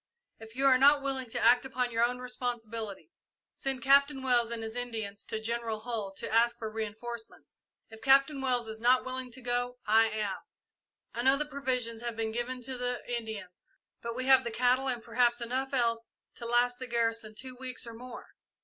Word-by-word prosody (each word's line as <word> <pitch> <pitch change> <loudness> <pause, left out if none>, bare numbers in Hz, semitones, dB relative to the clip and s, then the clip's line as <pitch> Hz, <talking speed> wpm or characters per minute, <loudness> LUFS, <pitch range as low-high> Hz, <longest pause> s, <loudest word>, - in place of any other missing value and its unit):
If 225 +1 -11
you 270 +1 0
are 260 -2 +6
not 285 +1 +6
willing 265 -3 -2
to - - -3
act 245 +2 +5
upon 255 -2 -2
your 230 0 +2
own 245 +1 +1
responsibility, 235 - -5 0.4
send 270 -1 -4
Captain 280 0 +4
Wells 240 -3 +3
and 230 -1 -3
his 220 +1 -5
Indians 220 -5 -4
to 220 - -3
General 225 -1 -3
Hull 220 -4 -3
to - - -4
ask 235 +1 +4
for 220 -1 -5
reinforcements. 225 +1 -7 0.3
If 225 - -12
Captain 275 +1 +4
Wells 250 -3 +1
is 220 0 -6
not 250 +2 +4
willing 255 0 -4
to 255 +2 -10
go, 245 0 -1
I 225 +1 +5
am. 210 -3 -2 0.8
I 235 - -2
know 265 +2 +5
the 300 - 0
provisions 250 -5 -2
have 235 -1 -4
been 225 -1 -2
given 245 +2 -3
to 255 0 -4
the 245 0 -1 0.2
Indians, 220 -6 -7 0.4
but 235 0 -4
we 255 +1 -3
have 265 0 +6
the 235 - -2
cattle 250 +3 +2
and 240 -3 -2
perhaps 240 +1 +2
enough 255 +3 -2
else 230 -3 0 0.2
to 235 - -7
last 245 +1 +2
the 255 - -5
garrison 230 -2 -1
two 255 +2 -7
weeks 255 -1 -3
or 230 - -8
more. 245 +2 -10
240 Hz, 195 wpm, -30 LUFS, 225-255 Hz, 0.8 s, are